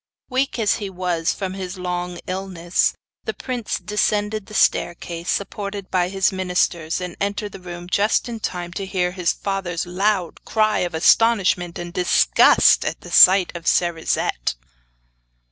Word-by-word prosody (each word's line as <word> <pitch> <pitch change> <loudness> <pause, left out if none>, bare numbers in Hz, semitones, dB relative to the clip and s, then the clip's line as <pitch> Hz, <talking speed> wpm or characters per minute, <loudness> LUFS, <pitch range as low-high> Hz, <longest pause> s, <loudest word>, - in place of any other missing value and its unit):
Weak 265 +1 0
as 220 -3 +1
he 200 -2 -5
was 175 -3 -1
from 190 -2 -4
his 190 -1 -6
long 180 -1 -4
illness, 185 -2 -1 0.3
the - - -3
prince 245 -4 -3
descended 210 0 -1
the 215 - -10
staircase, 170 -2 0
supported 200 -1 -3
by 180 -1 +1
the 195 0 +2
ministers, 180 -3 0
and 180 -1 -6
entered 205 +1 -2
the - - -10
room 175 -1 -9
just 205 +6 +1
in 230 -2 -5
time 175 -4 -4
to 195 +1 -5
hear 180 -2 -1
his 180 -2 0
father's 190 -4 -3
loud 185 0 -1
cry 215 -1 +1
of 175 -2 -2
astonishment 185 -2 +3
and 175 0 -7
disgust 180 -2 +4
at - - -4
the - - -11
sight 185 -1 +6
of 170 -1 -7
Cerisette. 165 - 0
185 Hz, 150 wpm, -21 LUFS, 175-200 Hz, 0.3 s, sight